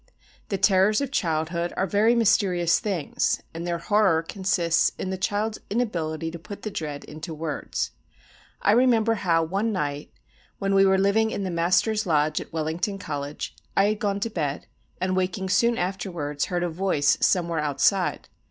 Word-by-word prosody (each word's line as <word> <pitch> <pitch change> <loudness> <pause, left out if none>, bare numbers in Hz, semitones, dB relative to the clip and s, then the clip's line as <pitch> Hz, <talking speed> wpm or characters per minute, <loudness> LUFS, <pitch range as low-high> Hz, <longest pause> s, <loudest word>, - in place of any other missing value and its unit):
The 195 - -1
terrors 195 +2 +4
of 280 -2 -3
childhood 170 - -1
are 190 - +2
very 210 +5 +3
mysterious 195 -7 +3
things, 190 -8 -1
and 165 +1 -5
their 170 -1 -1
horror 185 -2 +2
consists 175 -2 +1
in 190 - -3
the - - -1
child's 210 +3 -1
inability 165 -8 -2
to 170 - -8
put 205 +4 -10
the 215 - -4
dread 150 -5 -5
into 155 +2 -8
words. 155 -1 -3 0.7
I 200 - +5
remember 230 -1 +4
how 170 -6 +1
one 195 +7 -1
night, 145 -6 -3 0.5
when 195 0 -1
we 195 0 +5
were 190 0 +4
living 200 +3 +3
in 200 - -3
the 185 - -2
Master's 185 +5 +1
Lodge 150 -1 +2
at - - -11
Wellington 165 +6 -2
College, 145 -5 -5 0.2
I 195 - +6
had 215 0 -2
gone 200 -1 -1
to 230 - -2
bed, 150 -7 -3 0.3
and 185 0 0
waking 185 +1 -1
soon 235 +4 +3
afterwards 175 -6 -2
heard 175 -1 -2
a 175 - 0
voice 160 -4 +1
somewhere 170 -3 +2
outside. 150 +6 +1
185 Hz, 170 wpm, -25 LUFS, 165-205 Hz, 0.7 s, I